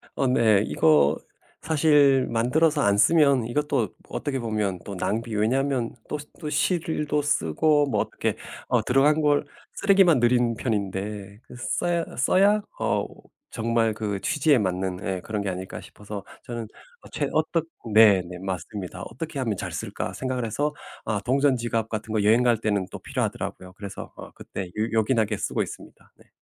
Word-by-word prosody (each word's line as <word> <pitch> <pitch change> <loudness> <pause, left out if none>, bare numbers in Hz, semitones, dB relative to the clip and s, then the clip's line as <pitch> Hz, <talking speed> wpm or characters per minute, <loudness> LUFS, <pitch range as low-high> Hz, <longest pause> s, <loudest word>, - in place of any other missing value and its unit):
어 135 - +1
네. 110 -5 +4
이거 75 0 +4 0.4
사실 145 -4 +4
만들어서 145 +7 +2
안 100 -5 +3
쓰면 140 -1 +4
이것도 120 -4 0 0.2
어떻게 135 -2 -3
보면 105 -5 -2
또 100 - -6
낭비 110 +4 -2
왜냐하면 125 +3 0
또 150 - -3
시 150 0 -10
또 155 -3 -4
실도 150 -2 0
쓰고 150 0 +2
뭐 - - +1
어떻게 - - -2 0.3
어 - - +2
들어간 145 +4 +3
걸 145 -1 +2 0.3
쓰레기만 195 -7 +4
늘인 120 -1 +2
편인데 100 -2 -3
그 - - -14
써야 170 +7 -1
어 - - -11
써야 200 - +4 0.2
어 - - 0 0.4
정말 115 -1 0
그 105 -2 -3
취지에 150 - +3
맞는 95 -2 -2
예 95 -1 -2
그런 105 +1 -3
게 100 - -2
아닐까 95 +1 -6
싶어서 105 -1 -9 0.2
저는 120 -3 -5 0.4
어 - - -15
최근 - - -2
어떻 160 +1 +1 0.3
네 105 -3 +7
네 90 - -7
맞습니다. 95 +1 -5
'어떻게 150 +5 -6
하면 115 -6 -1
잘 - - -5
쓸까?' - - -4
생각을 130 -2 -3
해서 145 +7 -1 0.3
아 105 -2 -1
동전 135 +1 +3
지갑 115 -2 -2
같은 110 0 -4
거 105 -2 +1
여행 115 +4 +4
갈 120 -2 +3
때는 105 -3 0
또 - - -7
필요하더라고요. 90 0 -4
그래서 100 0 -8
어 - - -10
그때 95 - -7
요 110 +5 -3
요긴하게 110 0 +1
쓰고 - - -1
있습니다. - - -12
네. - - -22
115 Hz, 325 characters per minute, -25 LUFS, 105-145 Hz, 0.4 s, 네